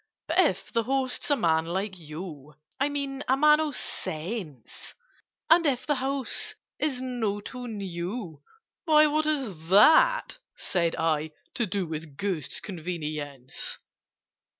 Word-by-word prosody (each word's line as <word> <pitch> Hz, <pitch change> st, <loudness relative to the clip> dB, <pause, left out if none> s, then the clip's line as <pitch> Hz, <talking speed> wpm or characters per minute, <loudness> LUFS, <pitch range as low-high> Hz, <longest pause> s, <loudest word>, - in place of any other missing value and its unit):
"But -, -, +1 dB
if -, -, +2 dB
the 230 Hz, -, +3 dB
host's 260 Hz, +3 st, -1 dB
a 290 Hz, -, +5 dB
man 165 Hz, -, +2 dB
like 190 Hz, +2 st, -2 dB
you— 150 Hz, -2 st, -8 dB, 0.2 s
I 275 Hz, +2 st, +2 dB
mean 280 Hz, -1 st, -3 dB
a 265 Hz, -, +3 dB
man 300 Hz, +1 st, +6 dB
of 305 Hz, -3 st, -1 dB
sense; 160 Hz, -, -5 dB, 0.5 s
And 335 Hz, +1 st, +6 dB
if 255 Hz, -3 st, 0 dB
the 300 Hz, -, +2 dB
house 270 Hz, 0 st, -1 dB, 0.2 s
is 280 Hz, -5 st, 0 dB
not 225 Hz, -5 st, -2 dB
too 250 Hz, -1 st, -6 dB
new—" 185 Hz, -, -5 dB, 0.4 s
"Why, 305 Hz, -2 st, +6 dB
what 305 Hz, +1 st, +2 dB
has 225 Hz, -, -1 dB
that," -, -, +6 dB, 0.2 s
said 170 Hz, -3 st, 0 dB
I, 155 Hz, -1 st, 0 dB, 0.2 s
"to 235 Hz, -, 0 dB
do 195 Hz, 0 st, -1 dB
With 155 Hz, -3 st, -7 dB
Ghost's 185 Hz, -8 st, -2 dB
convenience?" 155 Hz, -, -5 dB
205 Hz, 135 wpm, -27 LUFS, 160-270 Hz, 0.5 s, man